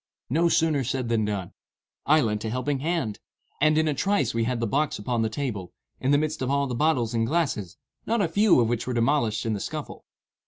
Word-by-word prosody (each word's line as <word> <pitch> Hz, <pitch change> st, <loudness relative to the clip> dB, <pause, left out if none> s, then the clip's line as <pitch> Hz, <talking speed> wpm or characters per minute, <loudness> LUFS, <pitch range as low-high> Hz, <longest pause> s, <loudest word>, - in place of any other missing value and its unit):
No 170 Hz, +4 st, +3 dB
sooner 160 Hz, -4 st, +2 dB
said 125 Hz, -1 st, -2 dB
than 110 Hz, -2 st, +1 dB
done. 100 Hz, -4 st, -3 dB, 0.5 s
I 155 Hz, +1 st, +5 dB
lent 105 Hz, -4 st, -1 dB
a 110 Hz, -, -2 dB
helping 130 Hz, +4 st, -1 dB
hand; 155 Hz, -8 st, -2 dB, 0.4 s
and, 155 Hz, +1 st, +4 dB
in 160 Hz, 0 st, +3 dB
a 150 Hz, -, +1 dB
trice 145 Hz, -, +1 dB
we 115 Hz, 0 st, 0 dB
had 125 Hz, 0 st, -1 dB
the 115 Hz, -, 0 dB
box 145 Hz, +6 st, 0 dB
upon 115 Hz, +3 st, -1 dB
the 110 Hz, -, +1 dB
table, 110 Hz, -7 st, -4 dB, 0.3 s
in 130 Hz, -, -1 dB
the 145 Hz, -, +5 dB
midst 155 Hz, 0 st, -2 dB
of 130 Hz, -, -1 dB
all 140 Hz, 0 st, +2 dB
the 130 Hz, -, -4 dB
bottles 125 Hz, -4 st, +1 dB
and 115 Hz, -1 st, +1 dB
glasses, 140 Hz, -, -1 dB, 0.3 s
not 230 Hz, +1 st, +1 dB
a 200 Hz, -, +2 dB
few 200 Hz, 0 st, +4 dB
of 115 Hz, -, +3 dB
which 120 Hz, +1 st, -2 dB
were 125 Hz, -, -2 dB
demolished 115 Hz, -3 st, +1 dB
in 110 Hz, -, 0 dB
the 105 Hz, -, -2 dB
scuffle. -, -, -6 dB
130 Hz, 230 wpm, -26 LUFS, 115-155 Hz, 0.5 s, I